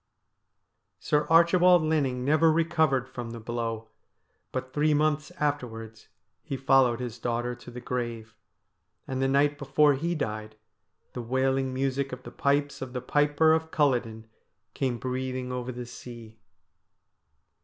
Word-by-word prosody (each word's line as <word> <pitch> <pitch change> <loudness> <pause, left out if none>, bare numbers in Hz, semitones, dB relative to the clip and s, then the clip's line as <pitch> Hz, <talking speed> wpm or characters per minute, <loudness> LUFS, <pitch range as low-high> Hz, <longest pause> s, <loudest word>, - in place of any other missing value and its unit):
Sir 150 0 0
Archibald 175 +1 +6
Linning 140 -5 0
never 155 +3 +4
recovered 160 -5 +1
from 120 -2 -7
the 115 - -7
blow, 115 -1 -4 0.6
but 130 0 -5
three 150 0 +2
months 150 0 +1
afterwards 115 -7 -3 0.3
he 140 -4 -5
followed 130 -3 +3
his 120 -2 -5
daughter 120 +1 -2
to 120 0 -12
the 120 0 -8
grave, 115 -3 -4 0.7
and 130 0 -3
the 135 - +2
night 145 +2 +2
before 145 +1 +3
he 170 +6 -2
died 110 -6 -4 0.6
the 125 - -4
wailing 130 +2 0
music 135 +1 -1
of 125 0 -7
the - - -9
pipes 140 0 0
of 130 -1 -6
the 125 - -3
Piper 145 +4 +3
of 160 0 0
Culloden 120 -8 0 0.5
came 130 -3 -1
breathing 130 0 -3
over 125 0 -4
the 125 0 -6
sea. 115 -2 -11
130 Hz, 140 wpm, -27 LUFS, 120-145 Hz, 0.7 s, Archibald